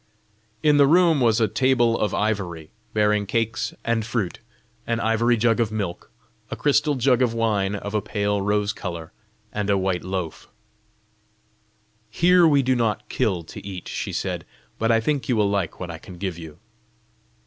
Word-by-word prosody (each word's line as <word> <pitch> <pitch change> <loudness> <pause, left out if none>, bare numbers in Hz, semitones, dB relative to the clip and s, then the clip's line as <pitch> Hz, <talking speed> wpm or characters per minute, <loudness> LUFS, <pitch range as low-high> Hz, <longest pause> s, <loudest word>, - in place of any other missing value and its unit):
In 150 -1 +5
the 140 -1 +6
room 165 -2 +4
was 115 -2 +3
a 110 - +3
table 120 0 +2
of 105 - 0
ivory, 95 -7 -2 0.2
bearing 105 -1 +1
cakes 115 +2 -1
and 115 -1 +1
fruit, 110 -5 -3 0.5
an 115 0 0
ivory 115 +1 +2
jug 115 +1 +2
of 115 -2 +1
milk, 100 -5 -4 0.4
a - - -4
crystal 145 0 +2
jug 130 -1 +2
of 120 -2 +1
wine 105 -3 0
of 100 +1 -6
a 105 - +1
pale 105 -1 -1
rose 105 +1 0
colour, 85 -2 -6 0.4
and 105 -1 -2
a 100 - +3
white 95 -2 -1
loaf. 95 -3 -4 1.6
"Here 175 +8 +5
we 140 -3 +4
do 130 0 +2
not 105 -3 -1
kill 90 -5 0
to 80 - -10
eat," 95 -3 -7
she - - -4
said; - - -3 0.4
"but 115 - +1
I 115 - +4
think 140 +4 -1
you 125 - +3
will 105 -2 +2
like 95 -5 -2
what 90 -2 -5
I 80 - -8
can 90 +1 -12
give 95 -2 -3
you." 80 -2 -10
110 Hz, 175 wpm, -23 LUFS, 95-120 Hz, 1.6 s, the